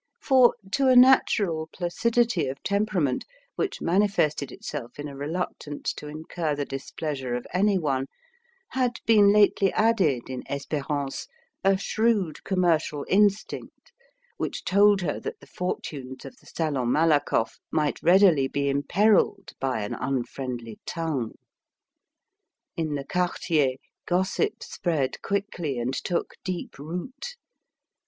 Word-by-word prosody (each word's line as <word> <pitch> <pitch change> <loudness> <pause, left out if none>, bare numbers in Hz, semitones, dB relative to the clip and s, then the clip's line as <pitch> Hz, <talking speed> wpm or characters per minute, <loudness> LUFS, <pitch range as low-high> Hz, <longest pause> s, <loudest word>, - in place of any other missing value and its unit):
For, 260 -3 +5 0.2
to 275 +2 +2
a 255 - +6
natural 205 -10 +5
placidity 230 - +1
of 135 +1 -6
temperament, 200 -10 0 0.3
which 405 -2 -2
manifested 165 -7 +1
itself 125 -3 -7
in 145 0 -5
a 140 - -9
reluctance 150 0 -4
to 150 - -9
incur 155 +1 -3
the 145 0 -2
displeasure 135 -1 -4
of 125 - -4
any 200 +2 +3
one, 135 -5 -1 0.6
had 255 -2 0
been 210 -3 +6
lately 205 -2 +4
added 190 - +2
in 130 -1 -5
Espérance 140 0 -3 0.4
a 195 0 +4
shrewd 210 -5 0
commercial 165 -6 +1
instinct, 205 - 0 0.5
which - - -3
told 200 +1 +5
her 160 -5 -2
that - - -6
the - - -15
fortunes 135 -7 -5
of - - -9
the - - -22
Salon 140 -7 -1
Malakoff 145 -8 +2
might 150 -2 0
readily 175 -6 +5
be 140 +1 -1
imperilled 190 +10 +2
by 130 -5 -1
an 105 - -4
unfriendly 125 -3 -4
tongue. 155 -9 -3 1.4
In 155 -3 -2
the 140 -1 -4
quartier, 165 -6 +1 0.3
gossip 190 - 0
spread 155 -7 -2
quickly 190 -8 -2
and 120 +2 -2
took 175 +5 -2
deep 180 -6 -5
root. 215 - -6
160 Hz, 125 wpm, -26 LUFS, 140-200 Hz, 1.4 s, a